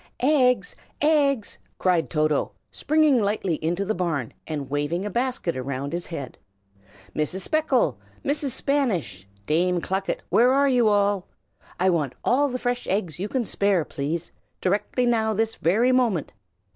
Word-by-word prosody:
"EGGS! 250 -7 +3 0.2
eggs!" 285 -6 +2 0.2
cried 180 -3 +1
Toto, 155 -1 0 0.2
springing 305 -5 +3
lightly 200 -6 -1
into 175 +5 0
the 215 - 0
barn, 165 - -2
and 150 -4 -4
waving 145 +6 -1
a 210 - -3
basket 245 -6 -1
round 140 +2 -4
his 175 0 -3
head. 140 -7 -7 0.8
"Mrs. 155 +5 -1
Speckle, 310 +6 +1 0.3
Mrs. 285 0 0
Spanish, 190 - -1 0.2
Dame 175 +3 +2
Clucket, 190 +3 -2
where 245 +2 +5
are 280 +1 +4
you 245 -4 +3
all? 205 -2 +1 0.5
I 185 +1 +3
want 150 -7 -1
all 285 +3 +3
the 255 - -2
fresh 245 0 -2
eggs 185 -5 -2
you 200 +3 -3
can 255 -3 -1
spare, 200 -5 +1
please! 155 +4 -4 0.3
directly 210 +6 0
now 220 -2 +1
this 225 +2 0
very 220 +10 +2
moment!" 235 - +1
200 Hz, 145 wpm, -24 LUFS, 165-250 Hz, 0.8 s, where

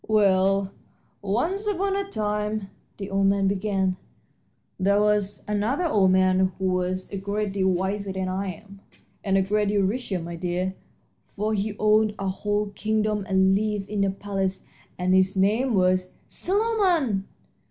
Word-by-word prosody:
"Well, 195 -2 +3 0.5
once 320 - -1
upon 395 -1 0
a 400 - 0
time," 210 - -2 0.3
the 195 -1 -6
old 195 0 +2
man 195 0 +2
began, 190 -1 0 0.8
"there 200 +2 +3
was 210 -1 +1
another 215 - 0
old 205 - +3
man 185 0 +3
who 190 - -3
was 185 0 -2
a 200 - -3
great 200 +1 -2
deal 190 -1 +1
wiser 190 +2 -1
than 190 0 -3
I 190 +2 -2
am, 200 +2 -14 0.4
and 195 -2 +2
a 190 - +3
great 210 +2 +1
deal 200 -1 +2
richer, 200 0 -1
my 170 0 -6
dear, 180 +2 -2 0.5
for 215 +2 -3
he 205 0 -2
owned 215 0 +3
a 195 -1 -2
whole 205 +2 -1
kingdom 215 -1 -1
and 190 0 +4
lived 210 0 -1
in 205 -2 +1
a 195 - +2
palace, 195 -1 -3 0.3
and 180 +1 +1
his 190 +1 +3
name 220 +6 +2
was 185 0 +1
" - - -36
"Solomon!" 365 - 0
200 Hz, 160 wpm, -25 LUFS, 190-210 Hz, 0.8 s, and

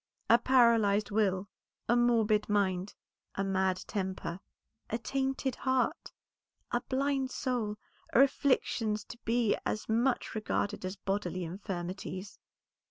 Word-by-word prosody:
A 235 - +7
paralyzed 230 -5 +4
will, 200 -2 +1 0.4
a 240 - +4
morbid 225 -3 +3
mind, 195 -2 0 0.4
a 195 - 0
mad 190 -1 0
temper, 190 -3 -3 0.5
a 225 - 0
tainted 265 +1 -2
heart, 260 -1 0 0.6
a 240 - +1
blind 270 +1 0
soul, 235 -5 -2 0.3
are 260 - +7
afflictions 230 -6 +1
to 235 - -11
be 230 -1 +2
as 215 - -2
much 235 +4 +1
regarded 210 -2 -2
as 185 +1 -3
bodily 190 -2 -2
infirmities. 185 +1 -5
215 Hz, 115 wpm, -31 LUFS, 195-240 Hz, 0.6 s, A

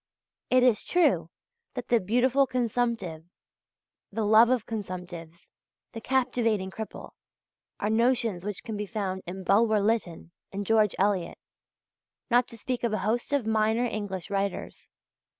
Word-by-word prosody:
It 255 0 +4
is 245 -5 +3
true 355 -1 +2 0.5
that 250 - -5
the 235 - +4
"beautiful 250 +7 +2
consumptive," 235 -9 -1 0.9
the 220 +2 -2
"love 220 +3 +6
of 255 -4 +1
consumptives," 180 -5 -7 0.4
the 225 - -7
"captivating 235 -7 0
cripple," 220 +2 -7 0.7
are 210 - 0
notions 230 -5 +1
which 205 -1 -5
can 225 -3 -5
be 210 0 -4
found 190 -3 -3
in 190 +2 -6
Bulwer 215 +3 +3
Lytton 200 -6 -1 0.2
and 200 +1 -4
George 215 -1 +3
Eliot, 190 -3 0 0.9
not 245 0 +4
to 230 - -11
speak 245 +2 -3
of 235 -2 0
a - - +1
host 235 +5 -1
of 285 -5 +1
minor 220 +2 +2
English 205 -5 -4
writers. 200 -1 -3
220 Hz, 140 wpm, -27 LUFS, 195-240 Hz, 0.9 s, love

